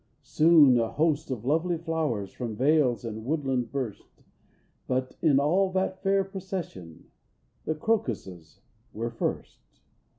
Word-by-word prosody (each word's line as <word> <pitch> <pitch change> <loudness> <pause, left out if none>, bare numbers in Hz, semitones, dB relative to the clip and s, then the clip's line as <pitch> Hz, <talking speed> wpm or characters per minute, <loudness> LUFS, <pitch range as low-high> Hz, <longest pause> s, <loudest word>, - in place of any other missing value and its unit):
Soon 155 -6 +5
a 115 -1 -1
host 155 +3 0
of 120 -4 -4
lovely 165 +5 +1
flowers 155 - -2
From 120 -4 -5
vales 130 -3 +2
and 110 -1 -6
woodland 130 -4 -1
burst; 130 -7 -6 0.6
But 130 0 -2
in 140 -3 +4
all 185 +7 +2
that 190 0 -1
fair 195 0 +2
procession 185 - -7 0.5
The 155 - -1
crocuses 105 - -3 0.3
were 115 +2 -3
first. 115 - -4
140 Hz, 125 wpm, -27 LUFS, 115-165 Hz, 0.6 s, Soon